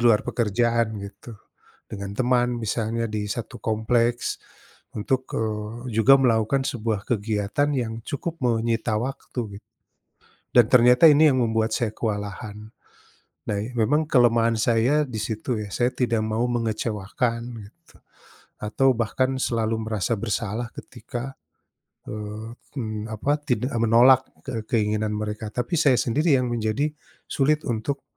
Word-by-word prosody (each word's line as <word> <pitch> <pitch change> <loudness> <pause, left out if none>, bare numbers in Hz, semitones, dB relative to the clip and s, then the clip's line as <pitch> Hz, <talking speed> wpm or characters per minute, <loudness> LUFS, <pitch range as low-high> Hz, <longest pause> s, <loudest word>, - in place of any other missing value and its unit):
luar 115 -3 +5
pekerjaan 115 0 0
gitu. 100 +4 -10 0.6
Dengan 100 -1 -6
teman 125 0 +2
misalnya, 115 +1 -1
di 105 -1 -2
1 115 +2 -5
kompleks 115 +2 0 0.6
untuk, 130 +5 -1
eee 110 +3 -3
juga 115 +5 +7
melakukan 125 +2 +2
sebuah 115 -6 -2
kegiatan 110 +5 0
yang 115 -3 -3
cukup 165 +5 -4
menyita 115 -2 0
waktu 120 -5 -5
gitu - - -56 0.9
dan 120 -3 +7
ternyata 125 +4 +7
ini 150 0 +6
yang 130 - +1
membuat 110 -1 0
saya 115 -3 -1
kewalahan. 105 0 -5 0.8
Nah, 105 - 0
i 110 +5 -5
memang 145 +8 +2
kelemahan 115 -4 +4
saya 120 +7 +3
disitu 110 +1 -3
ya. 105 - -5
Saya 120 +3 +1
tidak 120 -3 +1
mau 110 +2 0
mengecewakan 115 0 -1 0.2
gitu 105 +8 -16 0.9
atau 130 +6 +2
bahkan 125 +4 0
selalu 115 -2 0
merasa 110 -2 -1
bersalah 115 +2 -2
ketika, 120 +3 -7 0.8
eee, 105 +2 -6 0.2
mmm, 110 -3 -3
apa, 135 +7 0
tidak 125 +1 -1
menolak 120 +3 +6 0.2
ke 115 -4 -3
keinginan 105 -1 +1
mereka, 105 0 -4
tapi 125 +8 -2
saya 140 -5 +5
sendiri 145 +5 +2
yang 125 - -1
menjadi 120 +5 0 0.4
sulit 150 +2 +1
untuk 120 +4 -2
115 Hz, 130 wpm, -24 LUFS, 110-125 Hz, 0.9 s, juga